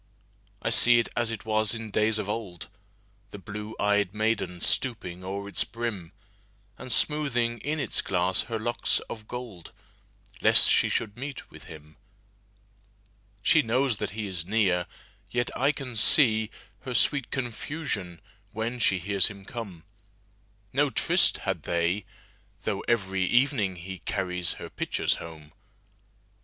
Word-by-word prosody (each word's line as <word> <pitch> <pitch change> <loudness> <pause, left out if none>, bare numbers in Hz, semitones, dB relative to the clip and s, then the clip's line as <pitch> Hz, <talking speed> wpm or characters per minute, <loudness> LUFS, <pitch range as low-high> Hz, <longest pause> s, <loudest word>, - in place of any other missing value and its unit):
I 115 - 0
see 120 +2 +7
it 115 - +1
as 120 -1 +1
it 110 -2 -5
was 110 0 +1
in 115 -2 -6
days 110 +1 +2
of 105 -2 -3
old, 95 -8 -5 0.6
The 105 - -9
blue 105 +2 -7
ey'd 105 -1 +1
maiden 110 -5 -1
stooping 95 -6 0
o'er 100 +2 -5
its 100 - +1
brim, 110 -7 -5 0.6
And 130 - -8
smoothing 120 -4 +1
in 155 +2 -2
its 135 - 0
glass 90 0 +1
her 115 - -1
locks 120 +2 0
of 110 -2 -8
gold, 120 -9 -8 0.7
Lest - - +7
she - - +4
should 105 -1 -2
meet 135 +1 -7
with - - -13
him. 75 -1 -13 1.5
She - - +5
knows 125 0 +1
that 105 - -3
he 110 - -2
is 90 -4 -3
near, 95 -3 +1 0.4
yet 120 0 -1
I 135 +3 +3
can 135 -4 -7
seeHer 110 -1 +4 0.5
sweet 140 0 +3
confusion 120 - -4 0.3
when 115 +3 -3
she 95 -4 +3
hears 95 +1 +2
him 100 -2 -10
come.No 100 - -6
tryst 120 - +4
had - - -1
they, 85 +3 0 0.6
though 100 -3 -1
every 95 -5 0
evening 120 -4 +2
heCarries 90 0 -2
her - - -9
pitchers - - 0
home. 80 -2 -10
105 Hz, 135 wpm, -27 LUFS, 95-120 Hz, 1.5 s, see